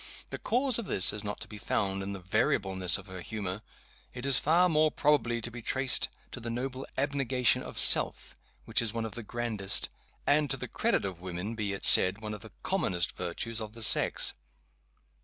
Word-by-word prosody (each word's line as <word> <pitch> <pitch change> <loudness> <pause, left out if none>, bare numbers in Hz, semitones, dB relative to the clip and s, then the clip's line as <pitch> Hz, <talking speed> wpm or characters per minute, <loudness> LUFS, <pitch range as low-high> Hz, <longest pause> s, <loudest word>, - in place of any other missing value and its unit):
The - - -6
cause 250 0 +1
of 225 - -6
this 95 - +4
is 105 0 -5
not 105 0 -5
to - - -7
be 105 - -10
found 95 -2 -1
in 95 +1 -5
the 100 - -6
variableness 95 -1 +1
of 95 - -12
her 95 -1 -9
humor. 100 0 -5 0.5
It 125 +1 -6
is 135 -2 +3
far 170 +4 +3
more 155 -2 +3
probably 145 -6 +1
to 120 - -5
be 120 +1 -9
traced 130 +3 +1 0.2
to - - -7
the 115 0 -6
noble 130 +3 -5
abnegation 135 -3 +1
of - - -9
Self, - - +6 0.3
which - - +1
is 115 -1 -1
one 115 -1 -2
of 110 - -6
the 120 - -6
grandest 110 -3 -2 0.4
and 145 0 +2
to 135 - -2
the - - -6
credit - - 0
of 90 -3 -6
woman 90 +4 -5
be 105 -3 -3
it 100 - -4
said 95 +3 +5
one 105 -1 -6
of 105 - -8
the 110 - -11
commonest 95 - -1
virtues 110 +6 -4
of 110 -1 -7
the 115 -1 -4
sex. 105 - +4
115 Hz, 205 wpm, -29 LUFS, 100-130 Hz, 0.5 s, Self